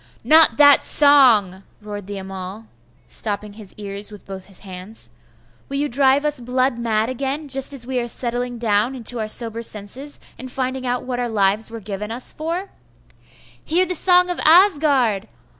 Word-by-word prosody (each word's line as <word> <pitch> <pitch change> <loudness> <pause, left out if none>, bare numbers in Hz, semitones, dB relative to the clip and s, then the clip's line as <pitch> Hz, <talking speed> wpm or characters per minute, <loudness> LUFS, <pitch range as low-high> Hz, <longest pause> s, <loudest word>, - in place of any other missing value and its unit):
'Not 315 +6 +5
that 285 -1 +6
song!' 240 -11 +6 0.2
roared 205 -2 -8
the 205 0 -6
Amal, 190 +2 -8 0.4
stopping 210 -1 -3
his 210 -2 -11
ears 200 0 -7
with 210 - -13
both 190 -1 -9
his 195 -3 -10
hands. 190 +3 -10 0.6
'Will 275 - -3
you 290 +1 0
drive 275 +2 +2
us 295 -4 -2
blood 255 0 -1
mad 220 -2 0
again, 275 +4 -4
just 270 0 +2
as 270 -4 -4
we 255 0 -2
are 240 - -3
settling 245 +1 -3
down 225 +2 0
into 245 -1 -4
our 215 - -3
sober 230 0 -1
senses, 235 +7 -4 0.2
and 260 - -7
finding 260 0 -4
out 245 0 -2
what 250 -1 -4
our 245 -1 -2
lives 210 0 0
were 230 0 -8
given 210 0 -6
us 240 +3 -4
for?' 340 +5 -5 0.9
'Hear 350 +4 +1
the 365 - -3
song 360 +1 +3
of 355 - -5
Asgard! 290 - +3
240 Hz, 175 wpm, -20 LUFS, 210-275 Hz, 0.9 s, that